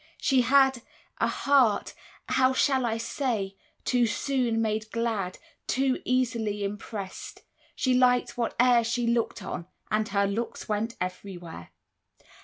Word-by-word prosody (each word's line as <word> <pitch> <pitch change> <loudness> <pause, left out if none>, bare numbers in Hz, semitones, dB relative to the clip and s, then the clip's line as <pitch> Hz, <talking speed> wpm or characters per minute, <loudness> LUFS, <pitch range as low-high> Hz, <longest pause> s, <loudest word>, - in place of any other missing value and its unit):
She 265 -2 +3
had 265 0 +4 0.4
A - - +3
heart 265 -7 +2 0.4
how 260 0 +3
shall 260 -2 +2
I 225 0 -1
say 225 -5 -2 0.3
too 245 -2 +3
soon 240 +1 0
made 220 -1 -1
glad, 225 -6 -2 0.3
Too 265 0 +1
easily 230 -5 0
impressed; 200 -1 -6 0.3
she 255 - +1
liked 250 0 +3
whate'er 240 0 +3
She 235 +1 -1
looked 235 -1 0
on, 170 - -5 0.2
and 215 0 +1
her 200 0 +2
looks 215 +4 -3
went 215 +2 -1
everywhere. 180 - -6
230 Hz, 125 wpm, -27 LUFS, 210-255 Hz, 0.4 s, had